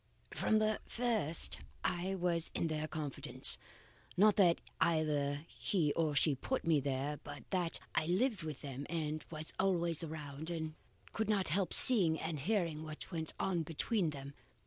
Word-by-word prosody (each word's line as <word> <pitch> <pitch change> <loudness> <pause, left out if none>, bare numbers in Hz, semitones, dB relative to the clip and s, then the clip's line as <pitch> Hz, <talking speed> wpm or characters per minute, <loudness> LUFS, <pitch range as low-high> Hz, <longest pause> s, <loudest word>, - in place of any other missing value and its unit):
"From 220 - +2
the 215 0 +1
first, 225 -10 +1 0.2
I 180 +2 -1
was 175 -2 0
in 165 - 0
their 155 0 -2
confidence. 150 -3 +3 0.6
Not 210 +2 +6
that 175 -4 +5 0.2
either 150 -3 +1
he 160 -7 0
or 155 -3 0
she 150 +1 +4
put 255 - -3
me 160 -3 +4
there, 140 +2 -2
but 145 0 -9
that 180 -3 +1
I 155 - +1
lived 200 +3 +1
with 155 -4 -6
them 140 0 -6
and 155 -2 -2
was 155 -1 -4
always 170 -4 +1
around, 155 -1 -6
and 160 -2 -3 0.4
could 220 -1 -1
not 200 -5 +1
help 185 +4 0
seeing 180 -11 +6
and 160 -2 -3
hearing 170 -2 0
what 155 +3 -8
went 160 -2 -4
on 180 -3 0
between 165 +4 0
them. 140 -1 -7
160 Hz, 160 wpm, -35 LUFS, 150-185 Hz, 0.6 s, Not